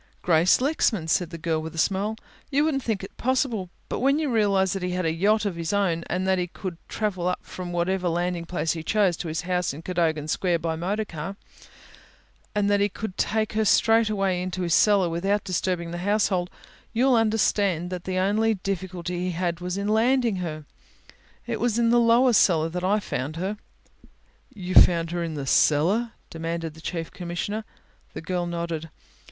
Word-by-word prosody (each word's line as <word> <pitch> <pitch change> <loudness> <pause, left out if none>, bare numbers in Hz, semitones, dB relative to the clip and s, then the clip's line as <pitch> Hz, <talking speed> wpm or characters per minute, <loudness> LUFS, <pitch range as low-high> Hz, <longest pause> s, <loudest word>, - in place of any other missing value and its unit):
"Grace 170 +1 +4
Lexman," 250 - +1
said 170 +1 +1
the 165 - -7
girl, 160 -1 -1
with 160 +1 -7
a - - -9
smile. 200 +6 0 0.3
"You 285 0 +2
wouldn't 285 -4 0
think 220 -6 -2
it 195 - -9
possible, 245 -7 0 0.2
but - - -3
when 275 +3 +3
you 305 -4 -1
realize 200 -4 +2
that 195 - -3
he 180 - -2
had 180 -1 -1
a 160 - +1
yacht 210 +6 +2
of 195 -4 -1
his 165 +2 -3
own 180 -5 +1
and 185 +2 -1
that 190 -1 +2
he 180 - -1
could 180 -1 -7
travel 190 -5 -2
up 180 - -2
from 180 -1 -7
whatever 180 +1 0
landing 175 0 -1
place 170 -3 -1
he 160 - -3
chose 195 +1 +2
to 175 - -5
his 160 -1 -2
house 180 -4 -1
in 160 - -10
Cadogan 165 -4 0
Square 175 +2 +1
by 165 0 -2
motorcar 190 0 -3 1.2
and 205 -1 +2
that 205 0 +3
he 205 +1 +2
could 200 -1 -6
take 215 0 0
her 220 0 +1
straight 225 +1 +4
away 195 -3 0
into 185 0 -3
his 170 -2 0
cellar 200 -2 +4
without 195 +5 0
disturbing 180 -2 -2
his 175 0 -5
household, 190 -3 +1 0.4
you'll 255 +3 +3
understand 205 -6 +1
that 180 -1 -5
the 185 0 -2
only 215 +4 +2
difficulty 185 -2 -4
he 185 - -1
had 170 0 -2
was 180 +1 -3
in 200 +1 -2
landing 230 0 +2
her. 155 -4 -5 0.8
It - - -3
was 235 -2 +1
in 235 -1 +3
the 240 - +5
lower 235 +2 +4
cellar 165 -6 +4
that 180 +2 -4
I 200 +3 +2
found 145 -6 -4
her." 190 +5 -2 1.0
"You 185 -6 -6
found 170 -2 +6
her 175 0 -2
in 165 -2 -4
the 140 -2 -4
cellar?" 185 - +3 0.2
demanded 165 0 -4
the 160 - -14
Chief 165 -1 -4
Commissioner. 185 +5 -4 0.5
The - - -5
girl 175 +1 -2
nodded. 170 -2 -4
185 Hz, 195 wpm, -25 LUFS, 170-210 Hz, 1.2 s, found